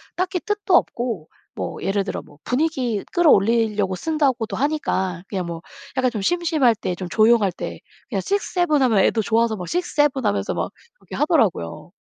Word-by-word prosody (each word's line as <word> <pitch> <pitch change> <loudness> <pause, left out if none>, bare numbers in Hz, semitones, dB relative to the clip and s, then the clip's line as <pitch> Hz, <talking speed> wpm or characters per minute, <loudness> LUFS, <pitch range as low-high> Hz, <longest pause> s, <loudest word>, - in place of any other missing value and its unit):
딱히 365 0 -1
뜻도 415 -1 0
없고 235 - 0 0.3
뭐 - - -4
예를 195 +1 +1
들어 195 - -4
뭐 145 - -19
분위기 250 -6 0
끌어올리려고 220 - +3
쓴다고도 265 - 0
하니까 190 - -1
그냥 185 -3 -3
뭐 165 -1 -6 0.4
약간 255 -1 +3
좀 215 -4 -4
심심할 320 - +2
때 185 - -3
좀 185 0 -6
조용할 215 -2 +4
때 - - -6 0.3
그냥 - - -1
6-7 355 -6 0
하면 225 -6 +3
애도 220 +3 +3
좋아서 225 +1 +1
막 180 -3 -6
6-7 295 -6 +1
하면서 205 -1 0
막 - - -2 0.3
이렇게 - - -9
하더라고요. 225 - 0
235 Hz, 325 characters per minute, -22 LUFS, 200-310 Hz, 0.4 s, 조용할